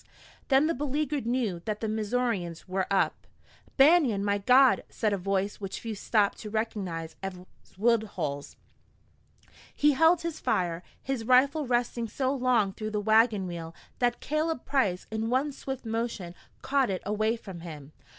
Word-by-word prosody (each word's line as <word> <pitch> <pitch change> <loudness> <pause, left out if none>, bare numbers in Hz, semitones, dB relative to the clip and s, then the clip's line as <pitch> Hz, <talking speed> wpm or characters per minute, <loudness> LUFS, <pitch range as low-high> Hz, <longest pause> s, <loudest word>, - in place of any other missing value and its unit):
Then 270 +1 +4
the 330 - +1
beleaguered 290 -1 -2
knew 230 -8 -1
that 215 -1 -2
the 220 - -2
Missourians 215 -6 -2
were 185 0 -1
up. 195 - 0 0.5
"Banion, 270 - +5
by 205 0 +1
God!" 255 +5 +5
said 215 -3 -1
a - - +1
voice 195 +2 -1
which 195 -1 -5
few 225 -1 -5
stopped 205 0 +1
to 215 - -7
recognize 195 -7 -3
as 195 -1 -4 0.4
Woodhull's. 200 -10 -1 1.2
He 295 0 +4
held 325 +4 +4
his 335 -2 -4
fire, 175 -2 0 0.2
his 265 -4 -2
rifle 275 +4 +4
resting 240 -1 0
so 260 +4 -1
long 245 -7 +2
through 215 +1 -5
the 210 -1 -2
wagon 220 -1 +3
wheel 170 -2 -6 0.2
that 240 -1 +1
Caleb 305 -2 -1
Price 210 -11 0
in 220 +1 -2
one 265 +4 +1
swift 265 -2 -6
motion 225 -6 -3 0.3
caught 270 -3 +2
it 185 -2 -3
away 215 +3 +1
from 195 -6 -9
him. 155 -4 -9
220 Hz, 155 wpm, -28 LUFS, 195-260 Hz, 1.2 s, Banion